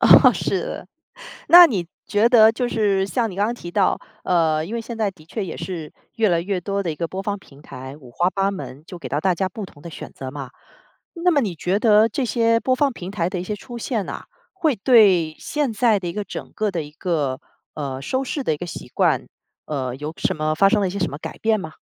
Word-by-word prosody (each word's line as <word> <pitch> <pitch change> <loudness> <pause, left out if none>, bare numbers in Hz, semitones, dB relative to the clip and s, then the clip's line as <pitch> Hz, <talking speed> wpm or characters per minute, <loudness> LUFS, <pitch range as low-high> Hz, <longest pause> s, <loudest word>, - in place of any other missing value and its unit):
哦， - - +8
是 - - -1
的。 - - -6 0.6
那 350 0 +11
你 195 - -2 0.2
觉 220 +2 +3
得 225 -2 +7
就 245 +1 -1
是 200 -4 +1
像 225 +1 -1
你 185 - -9
刚 205 +2 +2
刚 235 - -2
提 175 -7 -8
到， - - +2 0.3
呃， 160 -3 +2
因 215 +7 -6
为 230 - -1
现 230 0 -7
在 215 -3 0
的 165 -5 -19
确 195 +5 -4
也 175 - -6
是 165 -5 -6 0.2
越 225 -3 +3
来 170 -1 +2
越 185 +1 -2
多 200 +2 -2
的 175 - -2
一 155 - -3
个 165 +1 -3
播 190 +1 -5
放 205 0 -2
平 145 -6 -18
台， 130 +2 -9
五 130 -5 -14
花 175 +8 +1
八 195 +1 0
门 150 -8 -7
就 180 - -9
给 - - -7
到 145 - -1
大 185 +2 +2
家 190 +2 -1
不 205 +3 -7
同 145 -6 -14
的 - - -8
选 - - -9
择 130 -1 -7
嘛。 135 -2 -7 0.6
那 350 +1 +2
么 300 -4 +3
你 205 -9 -2
觉 180 +5 0
得 215 0 +5
这 255 +4 -2
些 230 -1 +2
播 255 - +2
放 275 0 +1
平 185 -3 -7
台 180 -4 -1
的 185 -2 -3
一 180 - -5
些 210 - -3
出 240 +3 -9
现 225 -3 -2
呐， - - -6 0.3
会 320 -8 +1
对 195 - +5
现 295 -5 -1
在 220 -1 +3
的 180 -2 -5
一 - - -3
个 210 +3 -3
整 - - -8
个 215 -1 0
的 170 -4 -2
一 145 - -10
个， 150 -5 -2 0.3
呃， 135 -3 -4
收 260 - -1
视 280 +2 -3
的 160 - +1
一 - - -6
个 175 - -6
习 - - -8
惯， - - +1 0.4
呃， 130 -4 -3
有 150 +3 -5
什 - - 0
么 155 0 0
发 195 +5 +5
生 210 +1 +2
了 200 - +1
一 - - -1
些 200 - -4
什 180 - 0
么 140 - -6
改 - - -7
变 220 -1 +2
吗？ 160 -4 -7
195 Hz, 275 characters per minute, -22 LUFS, 160-225 Hz, 0.6 s, 那